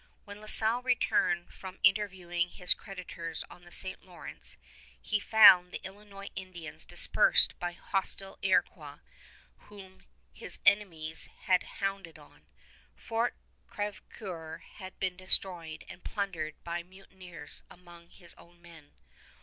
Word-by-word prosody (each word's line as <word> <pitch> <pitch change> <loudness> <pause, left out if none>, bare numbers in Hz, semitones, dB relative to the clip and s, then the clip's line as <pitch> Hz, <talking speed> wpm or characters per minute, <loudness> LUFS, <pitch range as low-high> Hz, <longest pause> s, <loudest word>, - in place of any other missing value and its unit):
When 205 +1 -10
La 215 - -11
Salle 225 +3 +4
returned 180 -8 +1
from 190 0 -9
interviewing 185 -4 +2
his 180 0 +3
creditors 175 -4 -7
on 175 - -15
the 175 - -16
St. 190 +1 -4
Lawrence, 180 -2 -10 0.4
he 210 - -1
found 190 -5 +8
the - - -7
Illinois 200 0 -10
Indians 170 -5 -8
dispersed - - +5
by 175 0 -3
hostile 195 +1 -2
Iroquois 155 -6 0 0.7
whom 190 -2 -14 0.3
his - - 0
enemies 165 -6 +2 0.2
had 185 -3 +3 0.2
hounded 195 -5 -3
on. 150 - -19 0.5
Fort 230 +1 -2 0.3
Crèvecoeur 185 -5 -6 0.2
had 190 -2 -10
been 185 -1 -2
destroyed 180 -4 +2
and 180 - -12
plundered 180 -7 -3
by 170 0 -3
mutineers 180 -3 -11
among 175 -1 -15
his 175 -1 -15
own 175 0 -19
men. 165 -4 -16
185 Hz, 125 wpm, -30 LUFS, 170-195 Hz, 0.7 s, found